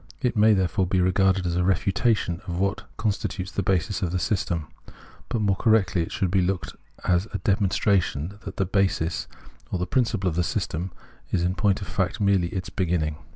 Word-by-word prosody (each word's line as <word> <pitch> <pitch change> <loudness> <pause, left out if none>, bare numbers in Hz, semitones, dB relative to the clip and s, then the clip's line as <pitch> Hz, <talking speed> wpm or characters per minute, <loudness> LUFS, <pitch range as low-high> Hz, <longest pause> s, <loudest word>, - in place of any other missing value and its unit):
It 125 -1 0
may 110 0 +5
there 95 -2 +2
fore 95 +2 0
be 95 +1 +1
regarded 95 +1 +3
as 85 -1 0
a 90 - +2
refutation 95 0 +1
of 85 -1 -3
what 100 +2 -1
constitutes 100 -3 -2
the - - -1
basis 95 +1 0
of 90 - 0
the 90 - 0
system; 85 -2 -1 0.6
but 115 -3 -1
more 100 -2 +3
correctly 100 -5 +3
it 80 - -4
should 95 -3 -1
be 95 -1 +3
looked 90 -2 -1 0.3
at - - +1
as 90 +3 +2
a - - 0
demonstration 95 -3 +1
that 100 - -7
the 95 - +1
basis 95 -3 0 0.4
or 90 -1 -1
principle 110 -5 0
of 85 - 0
the 90 - +2
system 85 +2 -2 0.4
is 85 - +1
in 90 +1 +1
point 100 +1 +1
of - - -8
fact 95 +4 -1
merely 100 -4 +3
its 90 +1 -5
beginning. 80 -5 0
95 Hz, 200 wpm, -25 LUFS, 90-100 Hz, 0.6 s, may